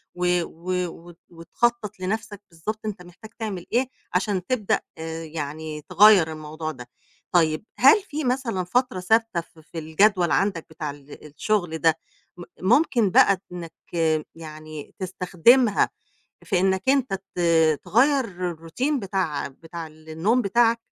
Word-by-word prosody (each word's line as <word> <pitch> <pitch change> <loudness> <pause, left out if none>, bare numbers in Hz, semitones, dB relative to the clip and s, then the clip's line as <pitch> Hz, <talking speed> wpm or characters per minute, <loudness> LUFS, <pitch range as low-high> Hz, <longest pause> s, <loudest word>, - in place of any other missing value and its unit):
و 180 - -2 0.2
و 170 +3 -7 0.2
وت 170 0 -14
وتخطَّط 210 +5 -2
لنَفْسك 210 +2 -4
بالضبط 175 +7 -5
أنت 205 -4 -4
محتاج 180 +5 -13
تعمل 200 -6 -4
إيه 250 +2 +2 0.3
عشان 185 0 0
تبدأ 230 -4 0 0.4
يعني 155 0 -5
تغيّر 200 -6 +6
الموضوع 155 +1 -5
ده. 125 -4 -11 0.4
طيب، 160 +1 +2
هل 275 - +7
في 310 -5 -5
مثلًا 245 -7 -1
فترة 245 +2 0
ثابتة 225 -1 +2
ف 165 -1 -21
في 160 +1 -8
الجدول 175 +3 +2
عندك 190 -5 +1
بتاع 155 -1 -5
ال 145 +1 -13
الشُغل 165 +2 -1
ده، 160 -1 +3 0.4
م 175 - -8 0.2
ممكن 235 - +3
بقى 190 +1 +5
إنّك 170 -2 -7 0.6
يعني 155 -2 -10
تستخدمها 190 +6 +3 0.5
في 190 -5 0
إنّك 190 0 +1
أنت 270 -5 +2 0.2
ت - - -1 0.4
تغيّر 200 - +1
الroutine 250 - -2
بتاع 190 -7 -2
بتاع 165 +4 -9
النوم 160 +9 -1
بتاعك؟ 230 +2 +3
180 Hz, 130 wpm, -24 LUFS, 160-220 Hz, 0.6 s, هل